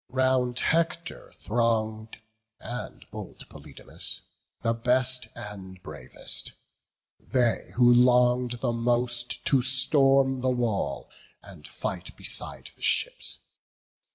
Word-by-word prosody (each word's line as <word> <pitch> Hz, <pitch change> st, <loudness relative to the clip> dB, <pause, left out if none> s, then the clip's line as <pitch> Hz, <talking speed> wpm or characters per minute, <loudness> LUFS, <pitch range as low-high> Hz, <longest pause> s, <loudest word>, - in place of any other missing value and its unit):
Round 130 Hz, -1 st, +1 dB
Hector 170 Hz, +2 st, -1 dB
throng'd, 110 Hz, -1 st, -1 dB, 0.4 s
and 120 Hz, +2 st, -7 dB
bold -, -, -9 dB
Polydamas, -, -, -6 dB, 0.4 s
The 115 Hz, 0 st, +2 dB
best 125 Hz, +2 st, +1 dB
and 95 Hz, -3 st, -9 dB
bravest; 65 Hz, -, -3 dB, 0.7 s
they 120 Hz, -3 st, 0 dB
who 120 Hz, 0 st, +6 dB
long'd 125 Hz, 0 st, +4 dB
the 120 Hz, -, 0 dB
most 120 Hz, +1 st, -1 dB
To 135 Hz, -3 st, +3 dB
storm 135 Hz, 0 st, +4 dB
the 130 Hz, +1 st, 0 dB
wall, 120 Hz, -5 st, -2 dB, 0.3 s
and 85 Hz, -7 st, -11 dB
fight -, -, -5 dB
beside -, -, -1 dB
the -, -, -24 dB
ships. -, -, 0 dB
125 Hz, 100 wpm, -27 LUFS, 115-130 Hz, 0.7 s, who